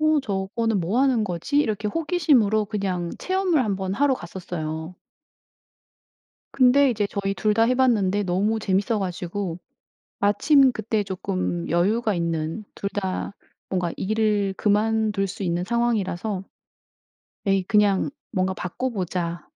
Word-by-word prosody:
어 310 -1 +3
저거는 210 0 -1
뭐 195 +9 0
하는 255 -5 +3
거지? 185 - -1
이렇게 215 -6 0
호기심으로 270 - +2
그냥 190 -5 -2
체험을 370 -6 +1
한번 190 -2 -2
하러 280 +1 +3
갔었어요. 170 -3 -6 1.6
근데 265 +1 +5
이제 210 -3 0
저희 195 -1 -2
2 210 +3 +1
다 225 - +3
해 250 +2 +2
봤는데 205 -6 +2
너무 200 +5 +1
재밌어 205 +2 0
가지고 180 -1 -4 0.6
마침 260 +7 +4
그때 220 -1 -1
쪼끔 185 -2 -3
여유가 210 +6 +2
있는 165 +3 -2
2 200 - -3
다 190 -1 -3 0.4
뭔가 180 -3 -1
일을 210 -1 0
그만둘 215 -1 +1
수 195 - -6
있는 175 0 -1
상황이라서 210 -4 -1 1.0
"에이 195 -1 +2
그냥 205 +2 +2 0.2
뭔가 190 -2 0
바꿔 185 +9 -3
보자." 175 -5 -3
205 Hz, 265 characters per minute, -24 LUFS, 185-225 Hz, 1.6 s, 근데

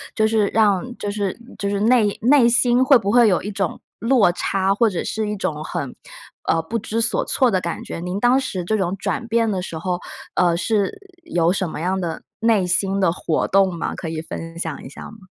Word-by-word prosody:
就 215 - +2
是 220 -2 +2
让 220 +3 +1
就 205 - -3
是 200 -2 -2 0.2
就 200 - -1
是 200 0 -1
内 220 -2 +3
内 250 +1 +5
心 245 +1 +3
会 270 0 +6
不 200 -3 -2
会 240 0 +6
有 185 -4 +2
一 205 - -5
种 195 -3 -3 0.2
落 230 -4 +4
差， 195 +2 0
或 225 +2 +3
者 185 - -3
是 220 -1 -2
一 210 - -2
种 155 -6 -3
很 140 -4 -4 0.5
呃， 165 - +2
不 225 +9 -3
知 225 +2 -2
所 230 - +1
措 255 -3 +2
的 190 - +2
感 170 -1 -4
觉。 - - -6
您 180 +2 -4
当 245 +5 +3
时 190 -9 -3
这 215 +5 0
种 190 -2 -1
转 235 +5 -3
变 230 -1 +1
的 190 -2 -2
时 170 -3 -6
候， 175 +2 -2 0.4
呃， 175 -2 +3
是 205 - 0 0.3
有 175 - +1
什 185 -2 -1
么 155 - -6
样 185 +2 0
的 170 -3 -4 0.2
内 225 -4 +3
心 195 +2 +1
的 185 - +3
活 165 -2 -1
动 190 -2 +3
吗？ - - -3
可 - - -6
以 160 -1 -4
分 165 +1 -8
享 165 -2 -4
一 - - -7
下 135 - -11
吗？ 220 - -13
200 Hz, 245 characters per minute, -21 LUFS, 175-225 Hz, 0.5 s, 会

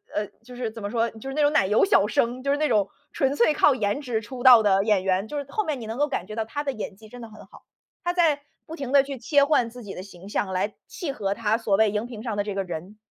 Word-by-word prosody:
呃 210 - 0 0.2
就 250 +1 -12
是 245 -3 -3
怎 225 -1 -9
么 205 - -3
说， 230 0 +1
就 225 +4 -9
是 270 - -5
那 300 - +2
种 290 +1 +3
奶 190 - +3
油 210 -1 +4
小 200 +1 +4
生， 235 +4 0
就 275 - -3
是 285 - +2
那 305 0 +1
种 210 -5 +2 0.2
纯 270 +1 +1
粹 265 +5 +4
靠 295 -1 +4
颜 210 +3 -1
值 240 -5 -2
出 245 +3 -8
道 245 -3 +8
的 195 -1 +3
演 210 -3 +2
员， 190 +2 0
就 295 - -5
是 285 - -3
后 430 - -1
面 305 -7 -3
你 225 - -7
能 225 +5 -5
够 295 - +3
感 230 -11 -3
觉 215 +2 -8
到 225 - -2
他 285 +6 -4
的 275 - -1
演 215 -4 -6
技 215 +2 -15
真 245 +2 -11
的 230 - -9
很 215 - -13
好， - - -17 0.4
他 350 - +1
在 330 -5 +2 0.2
不 325 - -8
停 275 -5 -5
地 275 -1 +6
去 275 -2 -7
切 280 +4 +3
换 280 -6 +2
自 245 +1 -11
己 200 -2 -7
的 - - -7
形 190 -1 -12
象 200 -2 -1
来 190 +3 -1
契 340 -7 -5
合 200 -6 -2
他 220 0 0
所 210 -4 +1
谓 220 -1 +4
荧 210 +3 -2
屏 225 -3 -9
上 225 -4 -3
的 205 - +1
这 205 -1 -5
个 195 - -1
人。 180 +3 -7
230 Hz, 330 characters per minute, -25 LUFS, 205-275 Hz, 0.4 s, 道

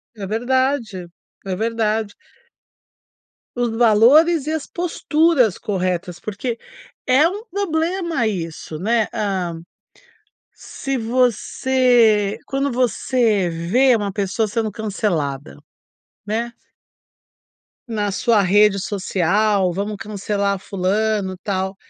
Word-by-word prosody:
É 205 -3 -6
verdade. 240 -4 -1 0.4
É 190 -1 -2
verdade. 220 -1 -1 1.4
Os 245 -1 0
valores 265 +8 +5
e - - 0
as 315 -2 -3
posturas 320 - +1
corretas, 180 -3 -3
porque 225 +3 -4 0.5
é 270 +5 +5
um 405 +5 -5
problema 340 - -1
isso 165 -5 -5
né, 225 +2 +1
hã. 185 -6 -2 0.9
Se 270 -1 -5
você 240 -2 +2
quando 275 0 -1
você 235 -5 +1
vê 225 +11 +2
uma 205 -2 -2
pessoa 200 +2 -1
sendo 215 0 -2
cancelada, 170 - -3 0.7
né. 230 +3 -2 1.4
Na 210 -3 -1
sua 220 +2 +2
rede 200 +1 +4
social, 195 0 +1
vamos 205 +2 -3
cancelar 200 -1 -2
fulano, 195 +1 -1
tal. 190 -1 -2
215 Hz, 95 wpm, -20 LUFS, 195-250 Hz, 1.4 s, valores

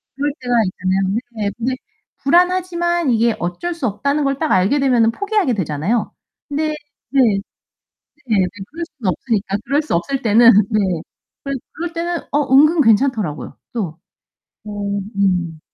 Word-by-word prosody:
그럴 285 +2 -1
때가 245 -1 -2
있잖아요. 190 +1 -1 0.2
네 210 -3 -2
근데 250 +2 -1 0.5
불안하지만 345 0 +2
이게 230 -1 +2
어쩔 175 - -3
수 320 -7 -2
없다는 280 +9 0
걸 275 -1 0
딱 315 +1 -1
알게 190 +10 +3
되면은 245 -4 +3
포기하게 405 - 0
되잖아요. 185 +5 -1 0.4
근데 305 +1 -1 0.3
네. 275 +2 +1
네 210 -5 +3 0.9
근데 210 -6 +2 0.3
그럴 335 +3 -5
수는 210 -8 0
없으니까. 200 - -1
그럴 285 +4 +2
수 310 - -4
없을 270 +11 -1
때는 230 +2 +7 0.2
네. 215 - +2 0.6
그럴 275 -1 -3 0.2
그럴 340 +1 -5
때는 340 0 -2
어 290 -2 0
은근 305 +4 +6
괜찮더라고요, 225 - +1 0.2
또. 180 -8 -4 0.7
어 210 - -8 0.5
음. 180 -5 0
245 Hz, 300 characters per minute, -19 LUFS, 200-300 Hz, 0.9 s, 때는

